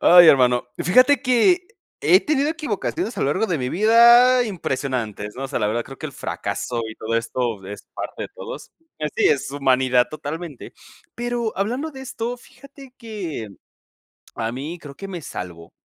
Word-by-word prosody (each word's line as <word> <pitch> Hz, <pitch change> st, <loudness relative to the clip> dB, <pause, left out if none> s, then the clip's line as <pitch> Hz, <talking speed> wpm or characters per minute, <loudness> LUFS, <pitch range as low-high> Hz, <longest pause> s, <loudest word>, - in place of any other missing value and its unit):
Ay, 175 Hz, 0 st, +8 dB
hermano, 125 Hz, -3 st, +4 dB
fíjate 255 Hz, +10 st, +5 dB
que 285 Hz, +8 st, +3 dB, 0.3 s
he 370 Hz, -, +5 dB
tenido 290 Hz, -1 st, +1 dB
equivocaciones 305 Hz, -, -3 dB
a -, -, -3 dB
lo -, -, +1 dB
largo 150 Hz, +10 st, +1 dB
de 175 Hz, -6 st, -1 dB
mi 125 Hz, -1 st, -2 dB
vida 235 Hz, -, +6 dB
impresionantes, 130 Hz, -, -3 dB
¿no? 135 Hz, -, -4 dB
O -, -, -5 dB
sea, 140 Hz, -, -2 dB
la 105 Hz, -, +1 dB
verdad, 115 Hz, +3 st, -1 dB
creo 135 Hz, -, -11 dB
que 155 Hz, -, -5 dB
el 140 Hz, -, -9 dB
fracaso 115 Hz, +2 st, -4 dB
y 110 Hz, -, -8 dB
todo 110 Hz, +1 st, -3 dB
esto 115 Hz, -3 st, -2 dB
es 105 Hz, +1 st, -9 dB
parte -, -, -5 dB
de -, -, -5 dB
todos. -, -, -8 dB, 0.3 s
Así 150 Hz, -1 st, 0 dB
es, 135 Hz, -1 st, +1 dB
humanidad 130 Hz, -3 st, +2 dB
totalmente. 155 Hz, -1 st, -7 dB, 0.4 s
Pero 240 Hz, -2 st, -2 dB
hablando 245 Hz, +11 st, -2 dB
de 265 Hz, -3 st, -10 dB
esto, 245 Hz, -2 st, -4 dB
fíjate 265 Hz, +1 st, -16 dB
que 195 Hz, -, -6 dB, 0.9 s
a 115 Hz, 0 st, -3 dB
mí, 145 Hz, +8 st, -5 dB
creo 145 Hz, -3 st, -10 dB
que 195 Hz, +6 st, -8 dB
me 180 Hz, -3 st, -5 dB
salvó, 85 Hz, -, -8 dB
170 Hz, 175 wpm, -22 LUFS, -, 0.9 s, Ay